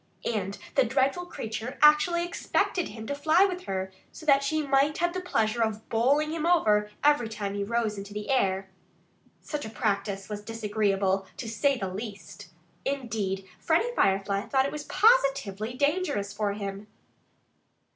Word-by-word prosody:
And 200 -3 -2 0.2
the - - +4
dreadful 270 +8 0
creature 225 -3 -5
actually 340 +3 +5
expected 350 0 -1
him 220 -1 -8
to 285 - -3
fly 315 +7 +4
for 365 -1 -5
her 190 0 -2 0.2
so 315 - -12
that 280 -2 +5
she 305 +2 0
might 280 +2 +2
have 345 +1 0
the 370 - -3
pleasure 225 -9 0
of 220 -1 -1
bowling 280 +7 +2
him 320 -1 -3
over 215 -12 +3
every 290 -6 +3
time 205 -3 -4
he 200 0 -2
rose 220 -1 -1
into 200 +1 -8
the 210 +4 -4
air. 195 -6 +1 0.7
Such 300 -1 -4
a 220 - -5
practice 200 -3 -2
was 210 -1 -5
disagreeable, 205 -3 0
to 235 - -5
say 275 +5 +1
the 195 - -3
least. 200 -4 -8 0.4
Indeed, 215 -8 -2
Freddie 350 +10 +1
Firefly 195 +1 +2
thought 265 -1 +2
it 280 - -2
was 300 -1 -6
positively 275 - +2
dangerous, 285 - 0
for 205 -1 -1
him. 200 0 -6
225 Hz, 160 wpm, -27 LUFS, 205-295 Hz, 0.7 s, actually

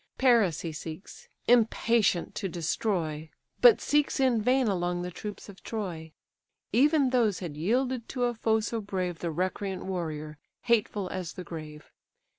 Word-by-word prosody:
Paris 230 - +4
he 165 - -4
seeks, 155 +4 -9 0.2
impatient 230 -5 +3
to 195 - -3
destroy, 165 -2 -2 0.3
But 480 -4 +8
seeks 295 -1 +1
in 255 -4 +3
vain 255 +2 +3
along 175 -2 -1
the 180 - -4
troops 205 +4 -7
of 200 -2 -13
Troy; 175 -8 -5 0.6
Even 280 +2 +4
those 230 -6 +2
had 170 -6 -6
yielded 240 - 0
to 250 -2 -2
a 240 0 +1
foe 220 -1 +1
so 225 +1 -3
brave 185 -4 -3
The 170 - -2
recreant 185 +3 -3
warrior, 155 -5 -4 0.2
hateful 210 -4 +1
as 180 -2 -5
the 180 - -7
grave. 155 -3 -9
195 Hz, 150 wpm, -28 LUFS, 170-235 Hz, 0.6 s, But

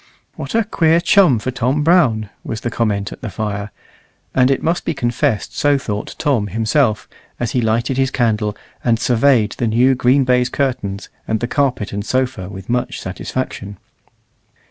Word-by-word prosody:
"What 140 - -5
a 230 - +4
queer 165 -5 +2
chum 170 - +4
for 130 +4 -3
Tom 130 +4 0
Brown," 125 - +3
was 115 - -5
the 120 - -3
comment 105 -4 -1
at - - -10
the 120 - -4
fire; 105 0 -4 0.6
and 130 0 +4
it 135 - 0
must 170 +2 0
be 165 - -2
confessed 120 -4 -1
so 145 -1 +3
thought 105 -6 -5
Tom 130 -9 +1
himself, 110 - +1 0.3
as 120 - -1
he 125 - +1
lighted 115 +3 0
his 135 -1 +2
candle, 110 -5 0 0.3
and 115 -2 +2
surveyed 120 -3 +3
the 120 - +1
new 120 +4 +4
green 130 +2 +3
baize 125 -1 +2
curtains 105 -8 -2 0.2
and 110 - 0
the 120 - -1
carpet 130 -7 -1
and 100 0 -3
sofa 130 -6 -1
with 95 -1 -9
much 120 +1 -1
satisfaction. 100 +1 -5
120 Hz, 170 wpm, -18 LUFS, 105-135 Hz, 0.6 s, a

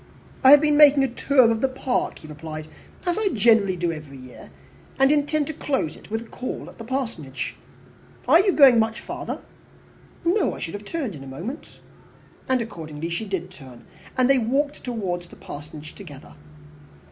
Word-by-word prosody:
"I 260 - +8
have 290 +1 +9
been 300 -1 +3
making 290 -2 +7
the 270 - +3
tour 255 -1 +3
of 225 0 -1
the 270 - +3
park," 260 -1 -2
he 155 - -13
replied, 155 0 -8 0.4
"as 355 +3 0
I 435 - +1
generally 210 -3 +4
do 175 -1 -1
every 155 -4 -9
year, 130 -1 -12 0.5
and 270 +1 +4
intended 300 +1 +1
to - - -12
close 265 - -1
it - - -16
with 225 +1 -2
a - - -10
call 250 +2 -6
at - - -16
the - - -6
Parsonage. 230 - -4 0.7
Are 330 - +7
you 385 +1 +3
going 270 -8 +7
much 220 0 0
farther?" - - -6 0.8
"No, 360 +2 +2
I - - -9
should 165 - -5
have 205 0 -7
turned 275 - -3
in 140 -4 -9
a - - -10
moment." 180 - -8 0.7
And 260 -2 +2
accordingly 165 -7 -6
she 170 +6 -3
did 185 -3 -4
turn, 130 -9 -14 0.3
and 255 -1 +4
they 270 -1 +4
walked 280 +6 -1
towards 190 -8 -3
the - - -15
Parsonage 150 +1 -10
together. 145 -9 -12
225 Hz, 185 wpm, -24 LUFS, 165-275 Hz, 0.8 s, have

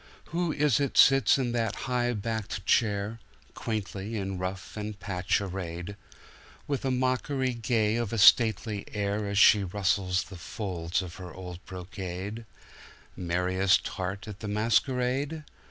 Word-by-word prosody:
Who 170 -1 0
is 150 -4 +2
it 140 -2 -1
sits 135 0 +6
in 125 -3 -1
that 115 -3 -1
high 120 -1 0
backed 110 -3 -4
chair, 105 -1 +1 0.3
Quaintly 105 -1 -4
in 95 -2 -3
ruff 95 +1 -5
and 105 -1 -5
patch 90 -2 0
arrayed, 90 -1 -5 0.7
With 140 -2 -2
a 135 - 0
mockery 130 +1 0
gay 115 -2 +1
of 120 -4 -2
a 115 - -2
stately 110 -1 +5
air 100 0 -1
As 100 0 -2
she 105 -1 +7
rustles 95 -1 0
the 95 - -11
folds 90 -2 -3
of 90 -1 -9
her 90 -2 -8
old 90 0 -9
brocade,—Merriest 95 -1 -3
heart 95 +2 -4
at 105 -2 -8
the 110 - -6
masquerade? 125 +7 0
105 Hz, 140 wpm, -28 LUFS, 95-120 Hz, 0.7 s, she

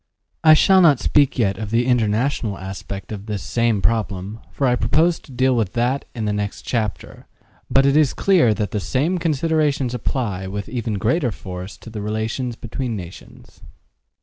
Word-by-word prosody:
I 155 -1 +8
shall 190 +4 +5
not 150 -7 +5
speak 145 -2 +2
yet 100 -5 +1
of 110 -2 -4
the 115 +2 +1
international 115 -2 0
aspect 95 +1 -7
of 105 0 -7
this 105 -3 -4
same 115 -5 0
problem, 105 0 -1
for 140 - -1
I 125 -1 +3
propose 165 +6 +2
to - - -17
deal 130 +1 +2
with 110 -5 -1
that 125 +4 0
in 110 -2 -3
the 105 - 0
next 105 -1 -3
chapter, 110 -5 -4 0.4
but 135 0 +4
it 140 0 +3
is 150 -3 +3
clear 170 - +3
that 105 -1 -2
the 105 - -1
same 150 - 0
considerations 150 -5 0
apply 105 -6 -2
with 100 +1 -5
even 115 -3 -3
greater 120 - +1
force 90 -1 -8
to 115 - -12
the 105 -1 -5
relations 110 +4 -3
between 120 +1 -4
nations. 90 -3 -11
115 Hz, 175 wpm, -21 LUFS, 105-135 Hz, 0.4 s, I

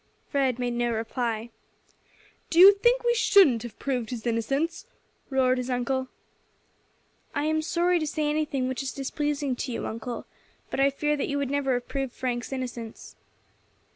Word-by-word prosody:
Fred 265 -4 +1
made 245 -1 -1
no 240 0 0
reply. 230 0 -2 1.0
"Do 330 - -2
you 390 +3 +11
think 475 +5 +2
we 475 0 +3
shouldn't 385 - +5
have 240 -1 -8
proved 250 -5 -2
his 240 -2 -6
innocence?" 275 - -1 0.4
roared 260 -2 +2
his 250 +1 -4
uncle. 260 +1 -1 1.3
"I - - 0
am 315 0 +1
sorry 350 +2 +1
to 310 - -2
say 300 0 -1
anything 295 -4 0
which 260 +1 -2
is 270 -1 -4
displeasing 285 0 -2
to 255 - -3
you, 230 - -3
uncle, 230 +2 -5 0.5
but - - -2
I 275 +1 +5
fear 295 +2 0
that 280 - -1
you 285 - -1
would 280 -2 -1
never 280 -2 +1
have 245 0 -4
proved 270 -3 -3
Frank's 245 -1 -3
innocence." 245 -4 -6
265 Hz, 170 wpm, -27 LUFS, 245-295 Hz, 1.3 s, you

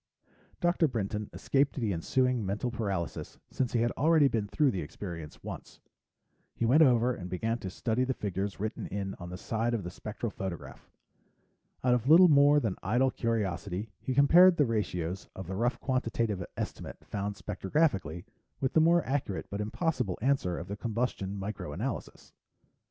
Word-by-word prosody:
Dr. 175 -1 +3
Brinton 105 -4 -3
escaped 140 +1 +1
the 115 -7 -1
ensuing 125 - +1
mental 100 +5 -2
paralysis 100 -8 -3
since 130 -2 -1
he 120 - +2
had 120 0 +2
already 155 0 +4
been 110 -5 -1
through 145 +5 +2
the 95 -5 -3
experience 80 0 -8
once. - - -8 0.8
He 115 - 0
went 135 +8 +5
over 125 -3 +5
and 90 -5 -7
began 115 +6 -1
to 95 - -5
study 115 +6 -1
the 130 0 -1
figures 100 0 -3
written 110 +2 -3
in 95 -1 -4
on 90 0 -7
the 90 - -6
side 115 +4 -1
of 105 - -3
the 90 - -5
spectral 105 +3 -5
photograph. 95 -4 -7 0.9
Out 125 -1 +4
of 125 +2 0
little 175 +3 +9
more 145 0 +6
than 110 -9 -2
idle 125 +7 +2
curiosity, 105 -3 -2
he 130 - -3
compared 170 +6 +7
the 145 - +4
ratios 95 -6 -2
of 95 - -6
the 95 - -5
rough 120 +5 0
quantitative 115 -7 -1
estimate - - -6
found 100 0 -3
spectrographically 95 - -1 0.3
with 130 - -1
the 160 - +5
more 170 +1 +4
accurate 130 -8 -2
but 100 +1 -2
impossible 120 - -1
answer 120 - +1
of 85 - -6
the 100 - -4
combustion 105 -3 -2
micro 100 +1 -5
analysis. - - -5
115 Hz, 170 wpm, -30 LUFS, 95-130 Hz, 0.9 s, little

